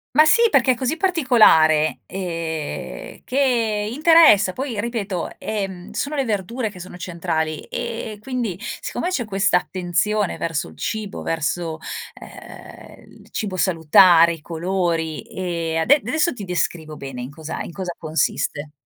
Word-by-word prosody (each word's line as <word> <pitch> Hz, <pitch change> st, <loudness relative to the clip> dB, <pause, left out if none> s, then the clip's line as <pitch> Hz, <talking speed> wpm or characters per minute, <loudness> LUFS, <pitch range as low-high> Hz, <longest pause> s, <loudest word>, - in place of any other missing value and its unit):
Ma 310 Hz, +1 st, +7 dB
sì 465 Hz, +9 st, +5 dB
perché 260 Hz, -2 st, +4 dB
è -, -, 0 dB
così 260 Hz, +6 st, -2 dB
particolare, 215 Hz, -, +4 dB
ehm, 165 Hz, -5 st, -5 dB
che 230 Hz, -6 st, +1 dB
interessa 310 Hz, -, +6 dB
poi 255 Hz, -3 st, -4 dB
ripeto, 205 Hz, -6 st, -3 dB
ehm, 195 Hz, -4 st, -5 dB
sono 290 Hz, +1 st, -3 dB
le 270 Hz, -2 st, 0 dB
verdure 220 Hz, +3 st, -2 dB
che 185 Hz, -3 st, -12 dB
sono 180 Hz, 0 st, -9 dB
centrali 165 Hz, -3 st, -2 dB
e 230 Hz, -3 st, -5 dB
quindi 235 Hz, -7 st, -3 dB, 0.2 s
siccome 355 Hz, -, -3 dB
c'è 270 Hz, -10 st, -1 dB
questa 195 Hz, -2 st, +2 dB
attenzione 185 Hz, +3 st, -1 dB
verso 165 Hz, -, -2 dB
il 80 Hz, -, -15 dB
cibo, 205 Hz, -, -4 dB
verso, 160 Hz, +1 st, -2 dB, 0.3 s
ehm, -, -, -13 dB
il -, -, -21 dB
cibo 195 Hz, -4 st, -3 dB
salutare, 170 Hz, -1 st, +5 dB
i 155 Hz, -, -13 dB
colori 170 Hz, -1 st, -2 dB
e 170 Hz, -3 st, -3 dB
ade 280 Hz, -, +4 dB
adesso 310 Hz, -, 0 dB
ti 205 Hz, -, -7 dB
descrivo 165 Hz, -3 st, -2 dB
bene 135 Hz, -3 st, -7 dB
in 130 Hz, -, -7 dB
cosa 155 Hz, +1 st, -6 dB
in -, -, -9 dB
cosa 180 Hz, -2 st, -5 dB
consiste. 155 Hz, -2 st, -2 dB
185 Hz, 145 wpm, -21 LUFS, 165-235 Hz, 0.3 s, Ma